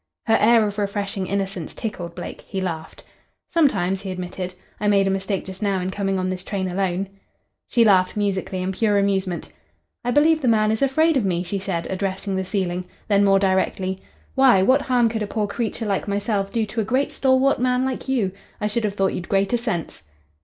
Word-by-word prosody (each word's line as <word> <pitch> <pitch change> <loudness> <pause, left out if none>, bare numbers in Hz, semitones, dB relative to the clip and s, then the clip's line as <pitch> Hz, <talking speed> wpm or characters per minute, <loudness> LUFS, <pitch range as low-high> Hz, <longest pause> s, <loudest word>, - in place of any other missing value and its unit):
Her 225 - +4
air 225 0 +5
of 205 0 -3
refreshing 200 -1 -2
innocence 195 -4 -3
tickled 175 -7 -5
Blake. 175 - -7
He 195 - -3
laughed. 165 -4 -5 0.5
"Sometimes," 195 - +2
he 195 - -6
admitted. 180 0 -5 0.2
"I 210 - 0
made 200 -1 +4
a 195 - +1
mistake 195 0 -2
just 190 +1 -9
now 200 -2 +1
in 185 +1 -2
coming 195 -1 -1
on 185 0 -1
this 185 -1 -5
train 190 -1 -2
alone." 185 +1 -1 0.6
She 235 -2 +3
laughed 185 -2 +4
musically 195 -2 -1
in 185 - -1
pure 205 +1 +2
amusement. 190 -3 -1 0.5
"I 245 - -1
believe 310 +5 +4
the 260 - 0
man 215 -2 +4
is 220 - -1
afraid 315 +3 +3
of 250 - +1
me," 180 -2 0
she 195 +2 -3
said, 185 -3 -2
addressing 195 +1 -2
the 190 - 0
ceiling. 185 -2 -2 0.2
Then 200 -1 +4
more 195 -1 +5
directly, 190 0 0 0.3
"Why, 260 -8 +5
what 260 +7 +4
harm 250 -3 +3
could 225 -1 -2
a 210 - -1
poor 210 0 -1
creature 225 +2 -3
like 200 -1 -1
myself 200 0 -1
do 225 -2 0
to 220 +2 -2
a - - 0
great 255 +6 0
stalwart 265 +1 +3
man 250 +1 +2
like 265 0 -4
you? 230 -8 +1 0.3
I 210 - -2
should 215 +2 0
have 205 -1 -2
thought 195 -1 +1
you'd 175 - -5
greater 195 +3 +2
sense." 220 - -3
200 Hz, 205 wpm, -22 LUFS, 190-225 Hz, 0.6 s, air